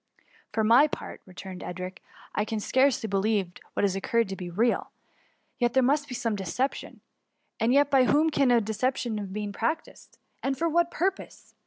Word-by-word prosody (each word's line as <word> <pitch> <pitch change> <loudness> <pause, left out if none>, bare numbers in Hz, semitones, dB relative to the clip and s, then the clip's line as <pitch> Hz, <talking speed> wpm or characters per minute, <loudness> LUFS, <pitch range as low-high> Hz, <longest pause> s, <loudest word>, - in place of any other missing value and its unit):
For 220 0 0
my 240 +7 +6
part," - - -7
returned 185 0 -9
Edric, 185 +1 -6 0.3
I 210 - +1
can 220 +1 -3
fcarcely 260 +2 +2
believe 200 -2 0 0.2
what - - 0
has 195 -2 +2
occurred 230 +2 0
to 195 - -3
be 180 -2 -6
real: 225 +7 +1 0.7
there 245 +1 +3
must 285 +3 +2
be 250 - -4
some 230 -3 -1
deception. 205 +8 -3 0.6
And 225 +2 +2
yet, 285 +1 +4
by 265 -2 +5
whom 310 +4 +3
can 275 -3 +3
a 240 -1 +5
deception 220 +1 -1
have 200 -2 -6
been 205 0 -4
practised, 235 +10 -4 0.2
and 270 0 -1
for 335 - +1
what 340 +1 +2
purpose? 380 +3 -3
230 Hz, 175 wpm, -27 LUFS, 200-270 Hz, 0.7 s, my